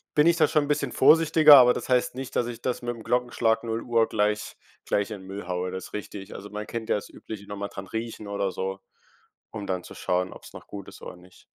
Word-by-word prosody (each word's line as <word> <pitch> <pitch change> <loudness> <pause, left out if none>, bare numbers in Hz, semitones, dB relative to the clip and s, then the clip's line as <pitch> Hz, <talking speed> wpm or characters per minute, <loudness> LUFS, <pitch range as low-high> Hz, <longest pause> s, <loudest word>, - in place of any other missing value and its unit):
bin 150 +2 +5
ich 170 - +5
da - - +5
schon 150 -2 +2
'n - - -8
bisschen 140 -4 0
vorsichtiger, 155 0 +7
aber 125 -1 +7
das - - -5
heißt 125 -1 +2
nicht, 130 -1 -7
dass 120 - +2
ich 120 -1 -7
das 125 -1 -2
mit 120 0 -2
dem 115 - -11
Glockenschlag 120 -2 +1
0:00 115 0 +1
gleich 105 0 -1 0.3
gleich 100 +1 0
in 100 -3 -7
Müll 95 -1 -7
haue, 90 0 -2
das 95 - -7
richtig. 100 -1 -7
Also, 100 +1 -8
man 105 0 -5
kennt 115 -1 -5
ja - - +3
das 105 - -8
übliche, 100 -2 -9
noch 105 - -6
mal 100 0 -4
dran 95 -1 -8
riechen 110 0 -5
oder 100 -1 -1
so, 95 +1 -4 0.7
um 105 -3 -6
dann 90 -2 -2
zu - - -11
schauen, 90 +1 -1
ob's - - -13
noch - - -11
gut 100 -2 -8
ist - - -14
oder - - -8
nicht. 90 +1 -19
110 Hz, 245 wpm, -26 LUFS, 100-120 Hz, 0.7 s, vorsichtiger